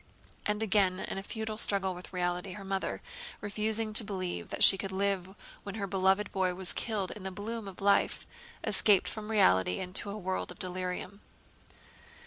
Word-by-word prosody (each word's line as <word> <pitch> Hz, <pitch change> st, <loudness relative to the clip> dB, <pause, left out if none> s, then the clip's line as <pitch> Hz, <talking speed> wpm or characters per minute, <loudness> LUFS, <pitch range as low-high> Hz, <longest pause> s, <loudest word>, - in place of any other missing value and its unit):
And 210 Hz, +1 st, 0 dB
again 195 Hz, -3 st, +3 dB
in 195 Hz, -, -4 dB
a -, -, -5 dB
futile 220 Hz, +1 st, -4 dB
struggle 195 Hz, -3 st, +1 dB
with 180 Hz, 0 st, -10 dB
reality 180 Hz, 0 st, -2 dB
her 200 Hz, +1 st, -8 dB
mother, 195 Hz, 0 st, -3 dB, 0.4 s
refusing 215 Hz, +1 st, 0 dB
to 220 Hz, -, +6 dB
believe 185 Hz, -4 st, -4 dB
that -, -, 0 dB
she -, -, +10 dB
could 195 Hz, 0 st, -4 dB
live 190 Hz, -1 st, -1 dB, 0.3 s
when 200 Hz, -, -7 dB
her 205 Hz, -3 st, -2 dB
beloved 195 Hz, +1 st, +2 dB
boy 185 Hz, -2 st, 0 dB
was 190 Hz, -1 st, -2 dB
killed 210 Hz, -5 st, -2 dB
in 210 Hz, -, -8 dB
the 190 Hz, -, -3 dB
bloom 210 Hz, +3 st, -5 dB
of 195 Hz, -1 st, -9 dB
life, 200 Hz, 0 st, +2 dB, 0.4 s
escaped 200 Hz, -4 st, +5 dB
from 215 Hz, -1 st, -5 dB
reality 95 Hz, -, +3 dB
into 185 Hz, +2 st, 0 dB
a 200 Hz, -, -5 dB
world 190 Hz, -2 st, -3 dB
of -, -, -9 dB
delirium. 185 Hz, +2 st, -4 dB
195 Hz, 175 wpm, -31 LUFS, 185-210 Hz, 0.4 s, she